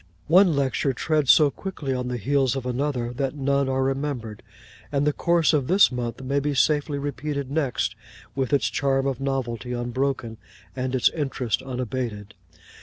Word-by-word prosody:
One 180 0 +5
lecture 135 0 0
treads 150 +1 0
so 150 -3 +7
quickly 155 -8 -4
on 125 -1 -2
the 125 0 -2
heels 135 +2 +1
of 135 -2 -4
another, 125 -1 -2
that 135 +2 -2
none 140 -1 +1
are 130 0 +1
remembered; 135 -5 -3 0.5
and 140 0 +1
the 150 - +2
course 170 0 +2
of 140 -4 +1
this 190 0 +5
month 125 +1 -4
may 140 +2 0
be 145 0 -1
safely 145 +1 +2
repeated 140 0 -4
next, 140 -5 0 0.4
with 135 -2 -2
its 140 - +3
charm 135 -1 +1
of 135 -1 -2
novelty 125 -3 -2
unbroken, 120 -1 -2 0.4
and 130 0 -2
its 125 - +4
interest 135 -6 -2
unabated. 125 -5 -4
135 Hz, 165 wpm, -24 LUFS, 125-145 Hz, 0.5 s, so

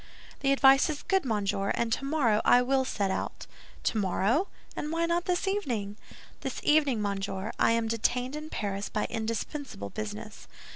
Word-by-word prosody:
"The 275 - +2
advice 275 +1 +6
is 300 -2 -4
good, 385 -5 +1
monsieur, 200 -3 0
and 230 -1 0
tomorrow 270 -7 +1
I 245 0 +6
will 265 +1 +2
set 200 -6 -1
out." - - -4 0.4
"Tomorrow! 215 - +1 0.3
Any - - -3
why 330 +2 0
not 340 +1 0
this 360 0 0
evening?" 240 - -1 0.4
"This - - -4
evening, 285 -8 +3
monsieur, 200 +1 -2
I - - +4
am 230 -1 +1
detained 245 +4 0
in 305 +1 -6
Paris 200 -4 -3
by 210 - -1
indispensable 225 - -4
business." 105 0 -6
235 Hz, 155 wpm, -29 LUFS, 205-290 Hz, 0.4 s, advice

